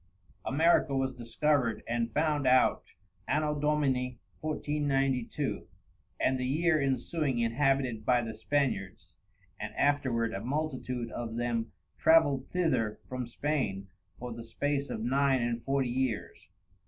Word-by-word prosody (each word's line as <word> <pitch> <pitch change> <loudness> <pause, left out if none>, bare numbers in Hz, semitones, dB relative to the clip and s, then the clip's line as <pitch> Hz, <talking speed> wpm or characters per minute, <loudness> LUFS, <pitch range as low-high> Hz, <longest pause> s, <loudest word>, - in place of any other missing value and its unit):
America 155 0 +3
was 130 0 0
discovered 125 +1 0
and 115 0 -1
found 150 +1 +1
out 130 0 +4 0.4
Ann. 150 +3 +2
Dom. 150 -1 -1 0.2
1492, 135 0 -1 0.5
and 130 0 +2
the 125 - -1
Year 155 +3 +2
insuing 135 +1 0
inhabited 125 -1 +1
by 125 +1 +3
the 110 -1 -5
Spaniards, 125 -5 -2 0.4
and 110 0 -6
afterward 125 -6 +1
a 100 - -4
multitude 130 -4 -3
of 115 -1 -5
them 120 -1 -1 0.3
travelled 145 -5 +4
thither 135 -12 0
from 130 -2 -4
Spain 120 -8 -2 0.3
for 125 -1 -6
the 115 0 -8
space 140 +5 -2
of 110 - -4
Nine 135 0 +2
and 120 0 -2
Forty 135 -2 0
Years. 125 -3 -3
130 Hz, 125 wpm, -30 LUFS, 120-145 Hz, 0.5 s, out